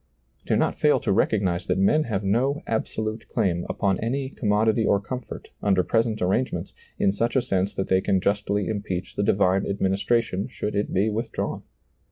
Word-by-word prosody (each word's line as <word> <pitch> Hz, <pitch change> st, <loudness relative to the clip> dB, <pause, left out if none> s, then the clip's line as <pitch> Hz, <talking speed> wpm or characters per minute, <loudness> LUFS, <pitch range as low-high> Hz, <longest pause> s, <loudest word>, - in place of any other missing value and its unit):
Do -, -, +2 dB
not -, -, 0 dB
fail 150 Hz, -, +4 dB
to 120 Hz, -7 st, 0 dB
recognize 95 Hz, -3 st, +1 dB
that -, -, +1 dB
men 150 Hz, +11 st, +3 dB
have 105 Hz, -5 st, -2 dB
no 130 Hz, +9 st, +1 dB
absolute 110 Hz, 0 st, -3 dB
claim 85 Hz, -2 st, 0 dB
upon 95 Hz, -2 st, 0 dB
any 130 Hz, +4 st, -2 dB
com 110 Hz, -, -3 dB
modity 110 Hz, +2 st, +3 dB
or 100 Hz, -1 st, +3 dB
comfort, 125 Hz, +5 st, -7 dB
under 95 Hz, -3 st, +3 dB
present 115 Hz, 0 st, 0 dB
arrangements, 100 Hz, +8 st, -1 dB, 0.2 s
in 95 Hz, -, +3 dB
such 115 Hz, +5 st, -1 dB
a -, -, +5 dB
sense 95 Hz, +1 st, -1 dB
that 95 Hz, -, -2 dB
they 95 Hz, 0 st, +3 dB
can 95 Hz, -, +1 dB
justly 100 Hz, +1 st, 0 dB
impeach 100 Hz, -4 st, -4 dB
the -, -, 0 dB
divine 95 Hz, -1 st, +2 dB
administration 100 Hz, +1 st, 0 dB
should 105 Hz, -, -4 dB
it 100 Hz, +1 st, -1 dB
be 105 Hz, +4 st, +1 dB
withdrawn. 110 Hz, +3 st, -3 dB
105 Hz, 180 wpm, -25 LUFS, 95-115 Hz, 0.2 s, a